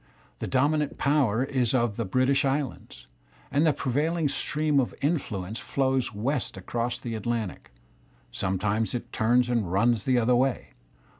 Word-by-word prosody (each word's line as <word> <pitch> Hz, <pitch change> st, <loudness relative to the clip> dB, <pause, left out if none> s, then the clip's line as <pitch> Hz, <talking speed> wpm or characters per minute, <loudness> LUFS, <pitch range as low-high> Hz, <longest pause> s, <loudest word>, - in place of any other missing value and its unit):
TheTj -, -, -4 dB
dominant 145 Hz, +3 st, +1 dB
power 135 Hz, -5 st, +2 dB
is 130 Hz, -3 st, 0 dB
on 120 Hz, -3 st, +1 dB
the 115 Hz, +2 st, -3 dB
British 130 Hz, +7 st, +2 dB
Islands, 140 Hz, -1 st, -3 dB, 0.5 s
and 145 Hz, +4 st, +3 dB
the -, -, +5 dB
prevail 145 Hz, +4 st, 0 dB
y 170 Hz, -, -2 dB
ing 150 Hz, -, +2 dB
stream 150 Hz, 0 st, +1 dB
of 130 Hz, -, -1 dB
influence 115 Hz, -, -2 dB
flows 130 Hz, -3 st, 0 dB
west 120 Hz, +2 st, -2 dB
across 120 Hz, +5 st, -2 dB
the 120 Hz, -, -6 dB
Atlantic! 110 Hz, -2 st, -3 dB, 0.6 s
Si\ -, -, -8 dB
Sometimes 105 Hz, +5 st, 0 dB
it 120 Hz, -, -6 dB
turns 120 Hz, +3 st, +3 dB
and 115 Hz, -7 st, 0 dB
runs 110 Hz, +3 st, +2 dB
the 130 Hz, -1 st, +3 dB
other 120 Hz, +1 st, +3 dB
way. 130 Hz, 0 st, 0 dB
125 Hz, 160 wpm, -27 LUFS, 115-140 Hz, 0.6 s, the